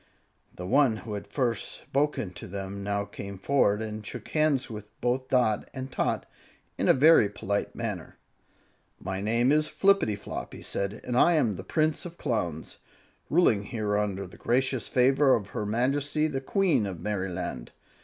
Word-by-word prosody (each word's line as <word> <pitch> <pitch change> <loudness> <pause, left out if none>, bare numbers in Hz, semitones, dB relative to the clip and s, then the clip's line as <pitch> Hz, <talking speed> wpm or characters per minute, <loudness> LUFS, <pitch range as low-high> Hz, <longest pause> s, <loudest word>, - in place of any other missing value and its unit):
The 90 - -6
one 130 +2 +3
who 110 - -5
had 100 - -5
first 120 -5 -1
spoken 140 -7 -1
to 90 - -9
them 100 +1 -5
now 100 0 -1
came 100 0 -8
forward 105 -1 +2
and 110 -1 -5
shook 110 +2 -8
hands 155 -4 +2
with 105 -3 -8
both 125 +2 0
Dot 120 -5 +1
and 130 0 -5
Tot - - -1 0.5
in - - -1
a - - +8
very 145 -6 +6
polite 100 0 -3
manner. - - -5 0.8
"My 95 +1 -4
name 115 +5 +2
is 155 +1 +3
Flippityflop," 185 - 0
he - - -9
said, 100 +2 -3
"and 125 - -3
I 170 +7 +5
am 120 - +2
the 95 - -7
Prince 155 +4 0
of 170 0 -13
Clowns, 90 - -3 0.5
ruling 115 - +3
here 105 -2 -2
under 100 -2 -1
the - - -13
gracious 130 -1 0
favor 135 +2 +4
of 105 -3 -4
her 105 - -3
Majesty 140 +7 +1
the 140 -4 -2
Queen 170 - +2
of 90 -4 -6
Merryland. 90 -10 -3
115 Hz, 165 wpm, -28 LUFS, 100-135 Hz, 0.8 s, a